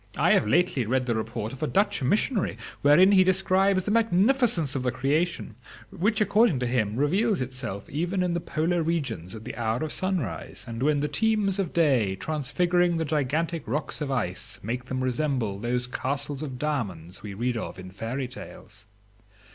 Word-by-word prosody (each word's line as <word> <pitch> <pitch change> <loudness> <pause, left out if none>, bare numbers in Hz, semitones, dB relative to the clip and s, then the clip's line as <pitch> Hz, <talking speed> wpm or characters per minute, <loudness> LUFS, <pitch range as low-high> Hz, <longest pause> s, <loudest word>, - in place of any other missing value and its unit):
"I - - +3
have - - +4
lately 165 0 +2
read 125 +3 0
the 120 - 0
report 110 0 -3
of 135 - -10
a 155 - 0
Dutch 200 -1 +1
missionary, 205 - +1 0.2
wherein 160 +7 +6
he 190 -2 +6
describes 190 +1 +3
the 205 - -2
magnificence 225 - +3
of 135 - -1
the 125 - 0
creation, 145 +1 -1 0.4
which, 210 +4 0
according 210 - +3
to - - +1
him, 115 -4 0
reveals 185 - +2
itself 125 -6 -5
even 175 +5 -1
in 180 -1 0
the 170 - 0
polar 165 +1 0
regions 140 - -2
at 110 - -9
the - - -6
hour 115 +3 -1
of 155 - -3
sunrise, 170 - -3
and 115 0 -6
when 145 +1 +2
the 150 - 0
teams 200 +4 +1
of 185 -5 -1
day, 130 - +2
transfiguring 170 - +1
the 160 - -1
gigantic 155 +3 -1
rocks 140 +6 -3
of 145 - -2
ice, 105 -9 -3
make 120 +3 -3
them 130 0 -3
resemble 125 -6 -1
those 125 +2 -1
castles 135 +3 -3
of 135 -5 -5
diamonds 100 - -3
we 100 -1 -7
read 120 +3 -1
of 115 - -5
in 95 0 -9
fairy 115 +7 -4
tales. 100 -5 -11
145 Hz, 180 wpm, -26 LUFS, 120-175 Hz, 0.4 s, wherein